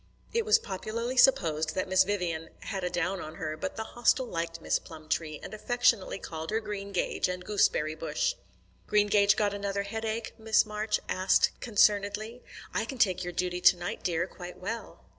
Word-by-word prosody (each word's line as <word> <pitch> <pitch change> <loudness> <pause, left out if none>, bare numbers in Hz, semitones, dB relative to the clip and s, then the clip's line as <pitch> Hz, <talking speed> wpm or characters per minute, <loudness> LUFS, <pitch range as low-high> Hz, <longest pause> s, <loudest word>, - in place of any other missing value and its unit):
It 460 -1 +1
was 435 +1 +6
popularly 230 - -4
supposed 160 - +4
that 185 - -1
Miss 190 0 +4
Vivian 175 -5 -2
"had 195 -3 -4
a 180 - 0
down 180 +2 -1
on 155 +1 -8
her," 155 -1 -4
but 285 - -4
the 220 - -3
Hostel 240 +3 +2
liked 165 -5 -4
Miss - - +1
Plumtree, 155 -1 -4
and - - -8
affectionately 230 -3 +1
called 160 -3 -6
her 220 - +1
Greengage 200 -3 -2
and 180 0 -4
Gooseberry 165 -7 +2
bush. 160 - -1 0.5
"Greengage 205 -1 +4
got 205 -1 +1
another 200 0 -2
headache?" 220 +2 -3
Miss 220 0 +3
Marsh 210 0 -1
asked 185 +1 +3
concernedly. 215 +1 +2 0.3
"I - - 0
can 260 +4 -6
take 185 -6 +2
your 175 - -4
duty 180 0 -2
to - - +7
night, 175 0 -4
dear, 175 -1 0
quite 180 -1 -10
well." 225 +5 -6
200 Hz, 175 wpm, -29 LUFS, 175-220 Hz, 0.5 s, to